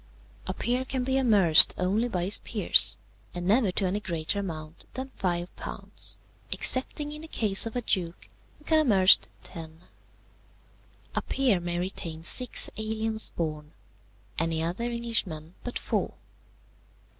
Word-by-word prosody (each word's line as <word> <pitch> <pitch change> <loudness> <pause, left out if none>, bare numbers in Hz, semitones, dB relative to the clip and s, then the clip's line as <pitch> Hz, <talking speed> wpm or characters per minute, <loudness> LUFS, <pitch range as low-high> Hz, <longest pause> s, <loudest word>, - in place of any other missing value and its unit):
"A 185 - -3
peer 245 +2 -2
can 260 -1 -4
be 265 +1 -1
amerced 200 -11 +6
only 200 +6 0
by 180 -7 -3
his 190 +3 +3
peers, - - +4 0.4
and 175 0 -4
never 215 +2 +2
to 195 - +2
any 190 +3 -1
greater 170 0 -3
amount 160 -4 -7
than 260 +1 -6
five 175 -2 -3
pounds, - - -5 0.3
excepting 290 +3 +3
in 300 0 -8
the 320 - -10
case 215 -7 +2
of 225 - -8
a 245 - -2
duke, 175 -5 -3 0.3
who 300 - -22
can 315 - +2
be - - +4
amerced 195 -9 +4 0.2
ten. 160 -2 -11 1.3
"A - - -1
peer 255 -9 0
may 175 0 -4
retain 170 -3 -5
six 250 +7 +2
aliens 220 0 -2
born, 155 -2 -6 0.7
any 165 0 -1
other 180 +8 -3
Englishman 225 -10 -1
but 245 - -5
four. - - -3
195 Hz, 145 wpm, -26 LUFS, 170-240 Hz, 1.3 s, amerced